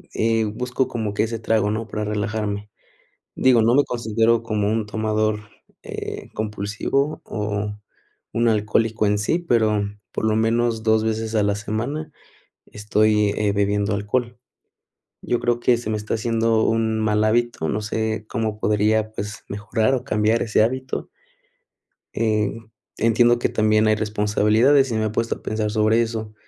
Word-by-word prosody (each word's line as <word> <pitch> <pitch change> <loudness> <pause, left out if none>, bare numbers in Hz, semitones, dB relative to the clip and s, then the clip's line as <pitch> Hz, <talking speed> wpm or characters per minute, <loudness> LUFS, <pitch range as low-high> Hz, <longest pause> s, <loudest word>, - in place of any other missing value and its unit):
eh, 115 0 +2
busco 125 +4 -2
como 110 -3 -3
que - - 0
ese 115 0 -2
trago, 110 -2 +1
¿no?, 110 +2 -3
para 105 0 -3
relajarme. 105 -1 -3 0.6
Digo, 125 -3 +4
no 115 +3 +4
me 145 - +4
considero 115 -1 +1
como 105 -2 -1
un 110 0 0
tomador, 110 0 0 0.4
eh, - - -6
compulsivo 110 +7 -2
o 105 -1 -3 0.6
un 120 0 +2
alcohólico 110 +1 +1
en 105 0 +2
sí, 105 +11 0
pero, 110 -10 +1 0.3
por - - -2
lo 110 -1 +2
menos, 115 0 +1
2 110 0 +2
veces 110 0 -2
a 105 - +3
la 100 0 +1
semana 120 +10 -4 0.6
estoy, 105 0 +1
eh, 105 -1 +1
bebiendo 100 +1 +1
alcohol. 120 +4 -2 0.8
Yo 120 - -1
creo 120 0 0
que 120 0 +3
se 115 -2 -4
me 110 - 0
está 105 +2 -3
haciendo 115 0 +1
un 110 -1 +1
mal 110 -1 +1
hábito, 115 -7 +1
no 105 +1 -1
sé, 110 0 -2
cómo 110 -2 -3
podría, 105 +1 +1
pues, 105 -1 -6
mejorar 110 +4 0
o 125 - -1
cambiar 110 -2 +1
ese 110 -1 +2
hábito. 130 +3 -2 1.1
Eh, 105 -3 +1 0.4
entiendo 120 +2 +3
que - - 0
también 110 0 +2
hay 110 - +4
responsabilidades 110 +5 +2
y 115 - -1
me 110 - 0
he 110 - 0
puesto 115 +2 -1
a - - -15
pensar 110 -1 -2
sobre 110 +2 +3
eso, 110 -2 -3
110 Hz, 160 wpm, -22 LUFS, 105-115 Hz, 1.1 s, Digo